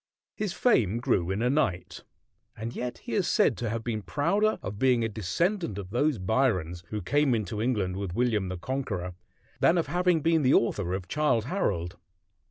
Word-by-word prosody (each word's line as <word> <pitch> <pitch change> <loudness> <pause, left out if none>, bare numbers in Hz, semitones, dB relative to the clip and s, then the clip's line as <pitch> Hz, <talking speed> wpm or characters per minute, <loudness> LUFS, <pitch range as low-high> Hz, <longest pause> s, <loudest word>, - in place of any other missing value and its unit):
His 210 -3 -2
fame 115 - +2
grew 90 -7 0
in 100 +4 -1
a 125 - +2
night. 95 -12 -1 0.5
And 115 +2 -5
yet 125 0 -4
he - - -9
is - - +1
said - - +3
to 120 -2 -2
have 115 +1 -3
been 110 -2 -2
prouder 175 - +1
of 100 +2 -5
being 125 -2 +3
a - - +1
descendant 115 - -1
of 95 -2 -7
those 145 +3 +1
Byrons 90 -5 0
who 105 +1 -4
came 145 +5 +2
into 105 -1 -3
England 105 -6 0
with 95 -3 -4
William 110 -6 +1
the 90 - -4
Conqueror 95 -5 -3 0.5
than 170 - +4
of 170 - +1
having 175 +2 +1
been 165 +1 +3
the 130 -1 +4
author 95 -5 +1
of 95 -1 -6
"Childe 125 -4 +1
Harold." 100 - -2
115 Hz, 185 wpm, -28 LUFS, 95-145 Hz, 0.5 s, than